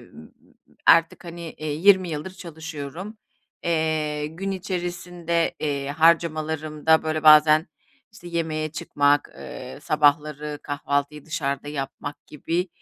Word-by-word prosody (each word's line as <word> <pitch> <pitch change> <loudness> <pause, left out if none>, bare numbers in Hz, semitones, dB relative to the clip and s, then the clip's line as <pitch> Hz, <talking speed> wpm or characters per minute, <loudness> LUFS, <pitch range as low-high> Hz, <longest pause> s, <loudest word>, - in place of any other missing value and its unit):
m - - -12
m - - -12
m - - -19 0.5
artık, 165 +1 +5
hani 170 -1 -8
20 180 +5 +3
yıldır 155 +3 -4
çalışıyorum. 165 +2 -8 0.5
Eee, 155 -2 0
gün 175 +6 -5
içerisinde, 175 -3 -2
eee, 140 -2 -2
harcamalarımda 160 0 +2
böyle 155 0 -2
bazen 155 +1 +7 0.5
işte 175 -5 -11
yemeğe 155 -2 -2
çıkmak, 145 -2 +1
eee, 130 +2 -8
sabahları 150 0 +1
kahvaltıyı 145 0 -2
dışarıda 140 -2 -3
yapmak 145 0 -6
gibi 170 +5 -2
155 Hz, 110 wpm, -24 LUFS, 150-170 Hz, 0.5 s, bazen